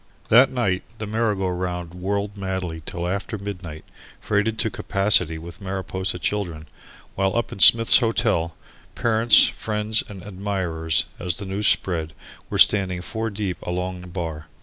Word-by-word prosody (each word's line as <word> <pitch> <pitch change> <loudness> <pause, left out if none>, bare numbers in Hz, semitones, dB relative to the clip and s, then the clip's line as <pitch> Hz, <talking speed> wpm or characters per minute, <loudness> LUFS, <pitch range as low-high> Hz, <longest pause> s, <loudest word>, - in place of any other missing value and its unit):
That 125 +4 +6
night 100 -8 -1 0.2
the 110 - -5
merry 110 0 -1
go 95 -1 -2
round 90 -1 -4
whirled 100 +3 -3
madly 95 -4 -5
till 85 0 -4
after 100 +3 -4
midnight, 90 -6 -8 0.3
freighted 105 +1 -1
to 110 - -1
capacity 95 -5 +1
with 85 +4 -11
Mariposa 95 -1 -3
children, 85 -5 -4 0.5
while 95 0 -1
up 120 - -2
in - - -9
Smith's 115 +5 +9
Hotel, 110 -8 -1 0.4
parents, 115 0 +5
friends 110 0 -1
and 95 -3 -10
admirers, 90 -6 -2
as 90 -1 -3
the 100 - -8
news 95 +2 -1
spread, 80 -4 0 0.4
were - - -3
standing 95 -3 +3
four 110 +3 -4
deep 100 -3 -5
along 90 +1 -4
the 90 - -11
bar. 80 -3 -6
95 Hz, 150 wpm, -22 LUFS, 90-105 Hz, 0.5 s, Smith's